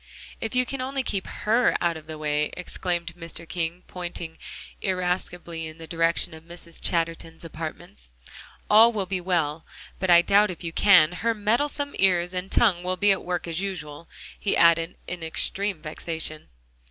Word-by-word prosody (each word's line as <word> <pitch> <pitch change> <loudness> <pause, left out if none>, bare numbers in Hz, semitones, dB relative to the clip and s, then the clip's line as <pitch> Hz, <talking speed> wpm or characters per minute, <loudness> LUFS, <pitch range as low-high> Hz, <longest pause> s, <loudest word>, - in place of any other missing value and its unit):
"If 225 +2 -4
you 250 0 +3
can 270 +1 -4
only 265 +1 -2
keep 195 -6 -2
HER 230 +3 +2
out 170 -1 +1
of 160 -1 -10
the 155 -1 -7
way," 150 0 0
exclaimed 175 -1 -3
Mr. 165 -1 -7
King, 170 +1 -3
pointing 175 -2 -6 0.4
irascibly 180 -3 -2
in 155 0 -10
the 165 - -9
direction 165 0 +1
of 160 - -11
Mrs. 170 0 -9
Chatterton's 165 -1 -2
apartments, 155 - -8 0.6
"all 220 +3 +7
will 205 -4 -2
be 185 0 -2
well. 165 -4 0 0.4
But 185 - -1
I 170 0 +7
doubt 205 +3 +4
if 180 0 -7
you 165 -1 -5
can; 180 -6 +6
her 230 +5 -1
meddlesome 285 +7 0
ears 180 -2 +3
and 185 +1 -4
tongue 195 -7 +3
will 185 +1 -2
be 205 +1 +4
at 195 - 0
work 175 -1 -3
as 165 +2 -2
usual," 165 -5 -6 0.3
he 200 - +1
added 170 0 +4
in 180 -1 -6
extreme 185 +2 0
vexation. 155 0 -4
175 Hz, 170 wpm, -25 LUFS, 165-195 Hz, 0.6 s, all